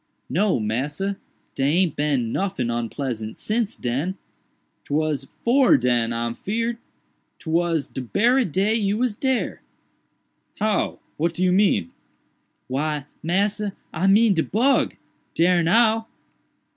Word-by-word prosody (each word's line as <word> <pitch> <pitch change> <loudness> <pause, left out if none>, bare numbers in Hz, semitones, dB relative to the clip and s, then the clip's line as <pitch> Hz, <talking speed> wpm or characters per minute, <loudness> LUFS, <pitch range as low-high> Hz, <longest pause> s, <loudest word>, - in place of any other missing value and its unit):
"No, 185 - +2
massa, 145 - -2 0.4
dey 135 +2 +1
aint 180 -5 +2
bin 140 -6 0
noffin 190 -11 -1
onpleasant 115 -1 -4
since 220 -1 -1
den—'twas 145 0 -4 0.2
'fore 250 - +5
den 120 -2 +1
I'm 115 0 -2
feared—'twas 175 - -3
de 130 - -6
berry 235 - +2
day 195 +5 +1
you 210 -2 +1
was 240 -3 0
dare." 265 +2 -1 1.0
"How? 215 -1 0 0.2
what 165 +2 0
do 180 - -1
you 180 - +3
mean?" 185 - +2 0.8
"Why, 145 +2 -2 0.2
massa, 200 +4 0 0.2
I 180 +4 0
mean 210 +2 +5
de 165 - +1
bug—dare 185 -6 +1
now." 225 +5 +3
175 Hz, 110 wpm, -23 LUFS, 135-210 Hz, 1.0 s, fore